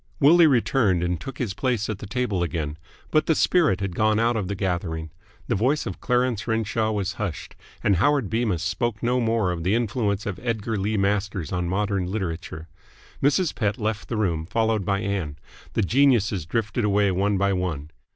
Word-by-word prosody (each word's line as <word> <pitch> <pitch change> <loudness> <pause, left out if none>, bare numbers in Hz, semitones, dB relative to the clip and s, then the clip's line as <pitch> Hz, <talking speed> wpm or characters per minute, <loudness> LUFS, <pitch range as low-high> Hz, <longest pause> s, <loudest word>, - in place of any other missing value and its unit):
Willie 165 +4 +7
returned 115 - +2
and 90 -2 -1
took 135 -1 -7
his 115 -7 -2
place 120 -1 -1
at 105 -3 -4
the 105 - -8
table 105 -4 -1
again. 80 -3 -3 0.3
But 155 -1 +2
the 160 - +3
spirit 160 - +3
had 100 -3 -2
gone 110 +3 +2
out 120 +1 +2
of 105 -4 -1
the 100 - -3
gathering. 85 -4 -2 0.4
The - - 0
voice 130 +8 +1
of 95 -6 -6
Clarence 125 -3 0
Renshaw 110 -1 0
was 100 -3 -1
hushed, 95 -7 -4 0.3
and 100 - +3
Howard 145 - +2
Bemis 110 -6 0
spoke 105 +5 -2
no 125 +2 +2
more 115 -5 +1
of 85 -2 -3
the 95 +6 +1
influence 110 -3 -1
of 100 -4 -4
Edgar 115 -2 -2
Lee 105 +2 -1
Masters 100 -4 -1
on 90 -1 -1
modern 100 -1 0
literature. 90 -4 -4 0.5
Mrs. 150 +5 +2
Pett 105 -4 -1
left 110 0 -3
the 115 - -2
room, 85 -6 0
followed 110 -1 0
by 100 +1 0
Ann. 95 -7 -3 0.4
The 110 - +1
geniuses 110 - +2
drifted 115 +4 -1
away 100 -1 +3
one 100 +2 +1
by 100 +1 +2
one. 80 -5 -3
105 Hz, 190 wpm, -24 LUFS, 95-115 Hz, 0.5 s, Willie